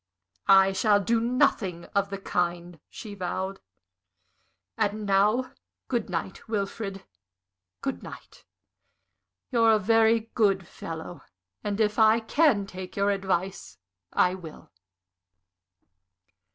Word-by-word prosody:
"I 195 0 +6
shall 205 +1 +3
do 225 +4 +1
nothing 200 -7 +1
of 200 0 +1
the 195 - -4
kind," 175 -2 -2
she 215 -3 -9
vowed. 190 0 -4 1.2
"And 215 -1 -1
now 210 +6 +2 0.4
good 235 -5 -1
night, 180 +2 -5
Wilfrid 200 -2 -4 0.8
good - - -3
night. - - -12 1.1
You're 230 -2 +5
a - - +5
very 225 +2 +3
good 195 -5 +2
fellow, 165 +2 -8 0.4
and 205 0 -2
if 210 0 +1
I 220 +1 +6
can 230 -3 +2
take 185 -1 -9
your 200 0 +2
advice, 190 - -2 0.3
I 180 - +3
will." 170 - -11
200 Hz, 110 wpm, -27 LUFS, 190-220 Hz, 1.2 s, I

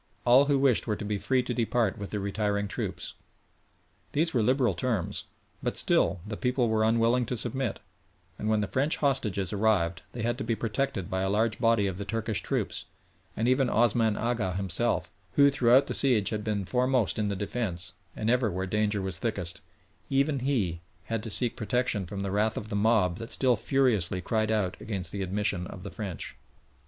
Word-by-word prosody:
All 125 +4 +6
who 145 -1 +2
wished 135 -4 +2
were 105 - +1
to 105 - -6
be 105 -1 -2
free 130 +3 +1
to 125 - -3
depart 115 -3 +1
with 100 - -5
the 105 - -3
retiring 100 +1 -1
troops. - - -4 1.0
These 160 +3 +1
were 120 - +2
liberal 125 -1 +2
terms, 105 +1 -2 0.4
but - - -2
still 90 -2 +2
the 105 0 -5
people 125 0 0
were 110 0 +2
unwilling 115 +2 +2
to 125 - -2
submit, 130 +2 0 0.6
and 105 - -2
when 110 -1 +2
the 105 - -1
French 140 +8 0
hostages 105 - 0
arrived 100 -5 +1
they 120 - -4
had 120 +2 -1
to - - -2
be 115 0 0
protected 110 -4 -2
by 95 0 -2
a 95 - 0
large 110 +2 +1
body 115 -3 +3
of 95 -1 -3
the - - -2
Turkish 110 0 -2
troops, - - -2 0.5
and 115 - +1
even 130 0 +3
Osman 115 -2 +2
Agha 115 -6 -1
himself, 95 +5 -1 0.2
who 140 0 +6
throughout 130 0 +5
the - - -3
siege 120 -7 +4
had 105 -1 -2
been 105 -3 -1
foremost 125 -1 +1
in 105 - +1
the 100 - -1
defence, 95 -3 -3 0.2
and 110 - -3
ever 125 -2 +2
where 95 0 -2
danger 105 0 0
was 95 -4 -2
thickest, 95 -4 -3 0.5
even 140 +1 +2
he 110 -11 -1 0.3
had 115 - 0
to 115 - -6
seek 120 +3 +3
protection 120 -4 -1
from 100 +2 -5
the 100 -1 -2
wrath 105 +2 +1
of 110 - -5
the 105 - -3
mob 100 -4 +2
that 115 0 -7
still 130 -2 +3
furiously 115 - +1
cried 110 +4 0
out 105 -5 0
against 95 -5 -4
the 100 - -4
admission 95 -1 -1
of 90 - -9
the 100 - -7
French. 95 -7 -5
110 Hz, 195 wpm, -28 LUFS, 100-125 Hz, 1.0 s, All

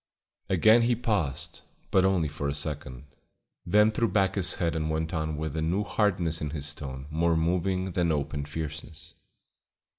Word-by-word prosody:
Again 110 +5 +5
he 120 +1 +2
paused, 105 - -2 0.3
but 95 - +4
only 95 -4 +2
for 75 -1 -3
a 70 - -2
second; 75 -4 -2 0.6
then 105 +4 +5
threw 115 +2 +1
back 95 -3 +2
his 95 -3 0
head 85 -2 -1
and 80 -1 -1
went 80 +2 -2
on 80 -2 -2
with 80 -1 -4
a 80 - -1
new 90 +6 0
hardness 90 -6 0
in 75 - -2
his 75 0 -3
tone 65 -2 -7
more 80 +1 +2
moving 90 +3 0
than 85 -1 +1
open 75 -1 -2
fierceness. 80 +1 -6
80 Hz, 170 wpm, -28 LUFS, 75-95 Hz, 0.6 s, Again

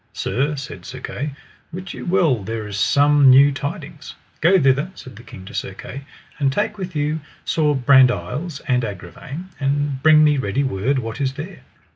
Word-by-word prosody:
Sir, 145 +4 -1
said 130 -10 -8
Sir 130 +6 -8
Kay, 140 +2 -5 0.4
wit 180 +2 -7
you - - -8
well 170 - +2
there 110 +1 -4
is 105 -1 -6
some 145 +3 +5
new 140 +2 +7
tidings. 140 0 -6 0.3
Go 185 +4 +5
thither, 140 +3 +2
said 130 - -11
the - - -12
king 95 -5 -12
to - - -11
Sir - - -4
Kay, 140 +1 -9 0.3
and 140 -2 +2
take 210 +6 -2
with 185 -3 -6
you 150 +2 -1 0.3
Sir 150 -2 +1
Brandiles 130 +4 +2
and 125 -1 +2
Agravaine, 110 - -7
and 140 -1 -1
bring 155 +1 +6
me 150 -2 +3
ready 130 +4 -1
word 130 +2 0
what 115 +1 -4
is 135 -1 0
there. 155 +7 -8
140 Hz, 180 wpm, -21 LUFS, 125-150 Hz, 0.4 s, new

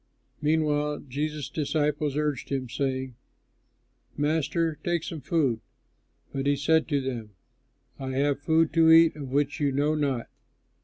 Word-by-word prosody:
Meanwhile 150 -1 +1
Jesus' 150 +2 -3
disciples 150 -1 -1
urged 150 -4 -1
him, 135 -2 -2
saying, 130 0 -2 1.0
"Master, 155 +1 0
take 175 -2 0
some 160 -3 -6
food"; 140 -6 +1 0.7
but 135 0 -2
he 145 - +3
said 160 +3 +2
to 145 -3 +1
them, 115 -6 -5 0.6
"I 130 -1 -4
have 140 +1 +1
food 160 +1 +2
to 165 -1 +5
eat 165 -1 +7
of 140 -3 -7
which 145 +1 0
you 145 -2 +1
know 145 +3 +1
not." 140 -6 -1
145 Hz, 140 wpm, -27 LUFS, 135-155 Hz, 1.0 s, eat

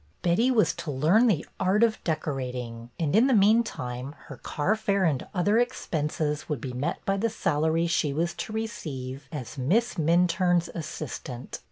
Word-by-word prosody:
Betty 180 +9 +3
was 235 -5 +3
to 160 - -5
learn 160 - +4
the 175 -9 +1
art 190 +4 +3
of 225 -2 +1
decorating 125 -7 -3
and, 160 +1 +1
in 230 +5 +6
the 265 - +4
meantime, 160 - +1
her 135 - -8
carfare 200 - 0
and 140 -5 -1
other 205 +4 +2
expenses 155 -11 -1
would 150 -4 -1
be 125 +1 -5
met 130 +4 -3
by 195 0 +1
the 230 +3 +1
salary 165 -5 +1
she 165 -3 +1
was 170 +4 -1
to 215 - -6
receive 140 - -5
as 140 -2 -6
Miss 210 - +1
Minturne's 175 +1 +2
assistant. 135 -6 -6
165 Hz, 160 wpm, -27 LUFS, 140-205 Hz, -, in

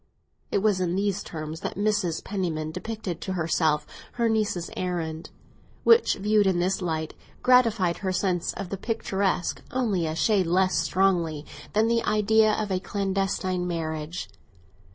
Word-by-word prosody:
It 200 - 0
was 205 -4 +2
in 175 -1 0
these 200 0 0
terms 155 0 -6
that - - -4
Mrs. 200 -5 0
Penniman 165 -6 -2
depicted 185 -1 -5
to 190 - -3
herself 160 -3 +1 0.3
her 235 -1 +1
niece's 210 -6 0
errand, 165 -3 -3 0.5
which, 465 0 +5
viewed 210 0 +2
in 185 -2 +2
this 185 +3 0
light, 160 -3 -2 0.3
gratified 230 -8 +4
her 190 -2 -2
sense 180 -2 0
of 195 -3 -6
the 195 - -3
picturesque 195 -4 -1
only 210 -10 0
a 155 - -3
shade 190 +1 +2
less 185 0 +2
strongly 165 -3 +1 0.3
than 215 +2 +3
the 230 0 +2
idea 215 +1 +3
of 210 -2 -2
a 185 - +1
clandestine 190 -2 -1
marriage. 160 -1 -3
185 Hz, 150 wpm, -26 LUFS, 170-210 Hz, 0.5 s, which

